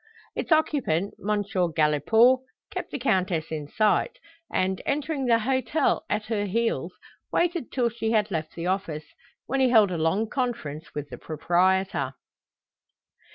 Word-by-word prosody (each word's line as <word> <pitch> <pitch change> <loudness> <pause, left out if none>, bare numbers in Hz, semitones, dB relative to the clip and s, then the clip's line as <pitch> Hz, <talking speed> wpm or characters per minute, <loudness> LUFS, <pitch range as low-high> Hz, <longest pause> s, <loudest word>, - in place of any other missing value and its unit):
Its - - -4
occupant, 265 - +2
M. 210 0 0
Galipaud, 185 - +3 0.3
kept - - -4
the - - -4
Countess 185 - 0
in 150 -2 -4
sight, 215 - +1 0.3
and, 190 0 0
entering 285 -1 -1
the 230 -1 +5
hotel 260 +5 +1
at 210 0 -1
her 215 -2 -1
heels, 230 +4 -1 0.4
waited 345 -6 0
till 245 -3 +1
she 225 -1 -3
had 215 -2 +2
left 155 -3 -3
the 170 - -4
office, 170 -5 -3 0.3
when 270 +2 -1
he 260 -1 +4
held 215 -5 +5
a 170 - -2
long 190 +8 +1
conference 215 - -4
with 145 -1 -4
the 125 - -8
proprietor. 175 -3 +1
205 Hz, 145 wpm, -26 LUFS, 165-245 Hz, 0.4 s, the